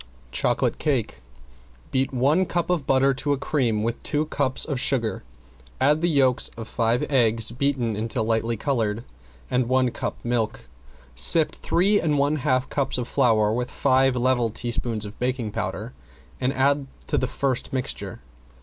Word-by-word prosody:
~CHOCOLATE - - 0
CAKE - - -1 0.7
~Beat 130 0 0
one 145 +8 +2
cup 175 0 -1
of 165 -6 -1
butter 135 +1 +3
to 145 +2 -1
a - - -1
cream 120 -7 0
with 115 +1 -2
two 150 0 -1
cups 140 -3 +1
of 140 -5 -3
sugar, 125 -4 +1 0.6
add 150 +4 +3
the 175 - +2
yolks 135 -5 +3
of 115 -1 -7
five 115 +1 0
eggs, 115 -4 +4
beaten 125 -3 -1
until 110 +2 -2
light 115 0 -1
colored, 115 -5 -1 0.5
and 125 -1 +1
one 130 -1 +2
cup - - -4
of - - -20
milk. 115 - -2 0.5
Sift 155 - +2
three 200 +4 +2
and 150 -3 +1
one 145 +2 +2
half 130 -1 0
cups 135 -2 -1
of 125 -1 -3
flour 110 -5 +2
with 125 +1 -2
five 130 -1 +2
level 125 -1 +1
teaspoons 115 -1 -2
of 105 +1 -10
baking 125 -3 -2
powder - - -4 0.5
and 125 - +1
add 140 +1 +1 0.2
to - - -2
the 130 - +1
first 130 -1 -2
mixture. 130 - -4
130 Hz, 165 wpm, -24 LUFS, 115-140 Hz, 0.7 s, eggs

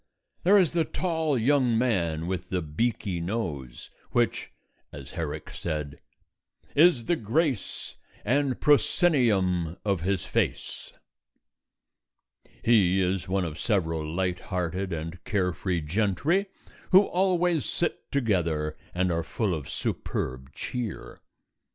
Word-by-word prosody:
There 200 +3 +6
is 185 -5 +4
the 170 -1 +2
tall 160 -4 -1
young 125 -1 +3
man 85 -10 +1
with 95 +1 -3
the 90 -2 -1
beaky 95 +3 -1
nose, 85 - -4 0.2
which - - 0 0.4
(as - - -9
Herrick 80 -3 -5
said) 75 -3 -4 0.8
Is 145 -6 +5
the 175 - +2
grace 135 - -1 0.3
And 135 -1 +1
proscenium 115 - +3
of 100 -5 +1
his 95 -1 -1
face. - - -2 1.7
He 95 -5 +4
is 95 -1 0
one 95 -1 +1
of 80 -2 -6
several 80 -7 0
light 90 +3 -1
hearted 90 +1 -3
and 80 +1 -5
carefree 90 -3 -1
gentry 105 - +1 0.4
who 190 +1 +8
always 180 -5 +1
sit 170 - -3
together 85 - 0 0.2
and 90 0 +1
are 85 0 0
full 100 +4 -1
of 75 -4 -5
superb 65 +1 -3
cheer. 120 -4 -5
95 Hz, 115 wpm, -27 LUFS, 85-135 Hz, 1.7 s, who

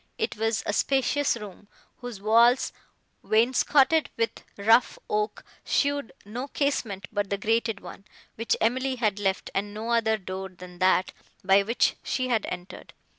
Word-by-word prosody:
It - - -2
was 225 0 -1
a 210 - -1
spacious 270 +2 +1
room, 205 -2 -10 0.3
whose 245 -5 -8
walls, 230 +5 +4 0.5
wainscoted 270 +6 +3
with 230 0 -2
rough 225 +4 +4
oak, 210 0 -2 0.2
showed 285 -3 0
no 240 +6 -5
casement 235 - -2
but 205 -2 -2
the 200 - -1
grated 225 0 0
one, 195 - -11 0.3
which 230 +1 0
Emily 260 +4 +1
had 215 -5 0
left, 195 -2 -1
and 205 +1 -2
no 225 +2 -4
other 225 -2 +2
door 190 -1 -6
than 180 -1 -13
that, 185 0 +3 0.3
by 195 +1 +5
which 230 +5 +1
she 255 -1 -2
had 225 -4 +1
entered. 180 0 -8
220 Hz, 150 wpm, -26 LUFS, 200-245 Hz, 0.5 s, by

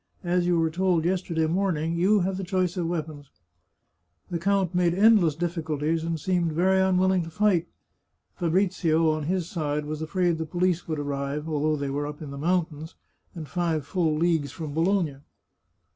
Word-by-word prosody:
As 175 0 +1
you 175 -1 +3
were 165 -1 +1
told 175 -1 +1
yesterday 175 -3 0
morn 180 +1 0
ing, 160 +2 -2
you 190 +4 +3
have 185 +1 -1
the 195 - -4
choice 185 -1 0
of 175 -3 -1
weapons." 155 -4 -5 1.0
The 170 - -1
count 190 0 +1
made 175 -1 +2
endless 200 -6 +5
difficulties, 160 -2 -2
and 165 -1 -2
seemed 175 -1 0
very 190 +4 +3
unwilling 190 0 +3
to 165 - -6
fight. 190 -3 +1 0.7
Fa 170 -3 -2
brizio, 165 -3 +2
on 155 -1 -2
his 180 0 -1
side, 150 -4 -2
was 155 +1 -5
afraid 175 0 0
the 160 - -2
police 175 +1 0
would 155 -2 -2
arrive, 145 +1 -3
although 155 0 0
they 140 -2 -3
were 145 +1 -2
up 150 0 -7
in 150 -3 -8
the 140 - -7
mountains, 160 -1 -1 0.4
and 160 -3 -7
five 165 -4 -1
full 165 -2 0
leagues 160 -3 +1
from 155 -3 -6
Bologna. 165 -3 +1
165 Hz, 180 wpm, -26 LUFS, 155-180 Hz, 1.0 s, endless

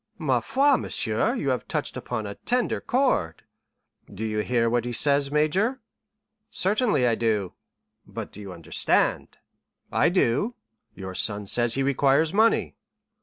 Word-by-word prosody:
"Ma - - +1
foi! 275 0 +2
monsieur, 115 - -1
you 140 - -2
have 125 -2 -2
touched - - -3
upon 110 -3 -4
a 100 - -5
tender 245 - -1
chord." 245 - 0 0.7
"Do 110 - -5
you 110 -1 -2
hear 115 +1 +1
what 120 0 +1
he 120 - -4
says, 140 +3 +1
major?" 185 - +1 0.7
"Certainly 210 - +1
I 120 - +3
do." 110 -5 -1 0.5
"But - - -7
do 105 - -11
you 100 -2 -8
understand?" 85 -3 -1 0.5
"I - - +3
do." 180 - +1 0.4
"Your 95 -1 -7
son 105 +2 +1
says 120 +3 +2
he 135 - 0
requires 140 +4 +2
money." 220 +3 +2
130 Hz, 145 wpm, -25 LUFS, -, 0.7 s, I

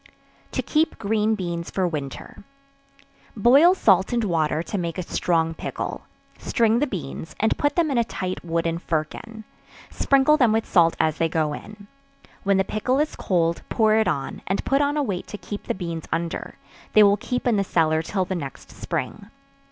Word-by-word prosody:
To - - -1
Keep 315 +1 +1
Green 220 0 +1
Beans 170 -4 -4
for 190 -2 0
Winter. 145 +2 -6 0.9
Boil 275 - +6
salt 190 - +3
and 240 -1 +1
water 160 -4 0
to 205 - -4
make 170 -1 -3
a 180 - -2
strong 165 -1 0
pickle; - - -5 0.3
string 230 -1 +2
the 295 - +1
beans, 160 - -6
and 220 - +2
put 290 0 0
them 330 -4 +2
in 250 - +2
a - - +3
tight 185 -4 -5
wooden 165 0 -1
firkin; 175 +8 -4 0.5
sprinkle 275 +2 +3
them 245 -7 +4
with 220 0 +1
salt 165 -2 +4
as 155 -1 +1
they 165 - +2
go 155 -2 0
in; 210 +5 -10 0.6
when 195 -1 +2
the 195 - +3
pickle 215 +7 -1
is 300 +2 0
cold, 170 -3 0
pour 220 -2 +3
it 220 -2 +3
on, 145 -6 -2
and 195 - -1
put 275 +1 +2
on 290 +1 +1
a 295 - +2
weight 195 -8 -3
to 210 - -7
keep 205 0 -7
the - - -1
beans 170 -3 -5
under; 165 0 -3 0.4
they 215 - +8
will 200 0 +5
keep 250 +4 -3
in 235 -4 +3
the 200 - +2
cellar 160 -4 +2
till 185 +3 -2
the 190 - -3
next 145 -7 -7
spring. 200 +10 -5
195 Hz, 190 wpm, -23 LUFS, 165-225 Hz, 0.9 s, they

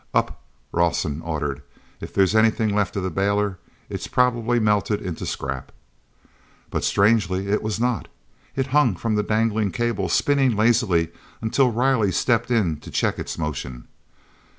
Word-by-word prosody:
"Up," - - 0 0.3
Rawson 80 -3 0
ordered, 75 -4 -3 0.4
"if - - -8
there's 95 -1 +3
anything 110 -1 +3
left 100 -3 0
of 100 - -2
the 95 - -2
bailer. 100 +1 0 0.3
It's - - -5
probably 120 -1 +2
melted 105 -1 +1
into 90 -6 -5
scrap." 65 -1 -4 1.0
But - - -2
strangely 100 -2 +2
it 105 - +1
was 110 0 -2
not. 120 -1 0 0.5
It 135 - 0
hung 145 -9 +4
from 115 +5 -2
the 105 - +2
dangling 110 0 +1
cable 105 -2 -1
spinning 135 +5 +2
lazily 105 -7 +2 0.3
until 125 +4 +2
Riley 120 -3 +2
stepped 115 +6 +1
in 100 -10 +1
to - - -12
check - - 0
its - - -5
motion. 65 -5 -5
105 Hz, 150 wpm, -23 LUFS, 90-115 Hz, 1.0 s, hung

